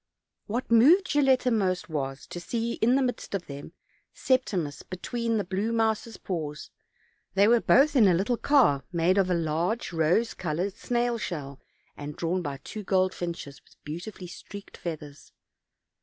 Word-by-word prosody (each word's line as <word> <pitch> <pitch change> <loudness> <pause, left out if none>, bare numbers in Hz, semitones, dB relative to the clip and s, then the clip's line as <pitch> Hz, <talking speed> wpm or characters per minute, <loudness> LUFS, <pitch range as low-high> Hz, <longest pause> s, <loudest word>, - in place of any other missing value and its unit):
What 235 +3 -3
moved 305 - +6
Gilletta 265 -3 +3
most 185 -5 0
was, 135 -4 -4
to 175 - -6
see 230 +6 -2
in 240 +3 +4
the 275 - +3
midst 245 -5 -3
of 185 - -3
them, 140 +3 -9 0.4
Septimus 190 - 0
between 230 +5 -3
the 205 - 0
blue 195 +4 -2
mouse's 225 0 0
paws; 155 -5 -5 0.6
they 200 +1 +5
were 235 0 +5
both 290 +3 +4
in 225 -6 +6
a 180 - +4
little 205 +8 +1
car 235 - +3
made 175 +3 +2
of 190 -1 +2
a 180 - +2
large 170 +7 -1
rose 170 +8 +2
colored 180 +3 -2
snail 240 +2 -1
shell, 140 -9 -5 0.3
and 145 0 -7
drawn 175 +2 -1
by 145 -4 -4
two 215 - -6
goldfinches, 180 -6 -1
with - - -24
beauti 170 +8 -5
fully 185 - -10
streaked 200 +3 -10
feathers. 150 -4 -8
190 Hz, 160 wpm, -27 LUFS, 165-230 Hz, 0.6 s, moved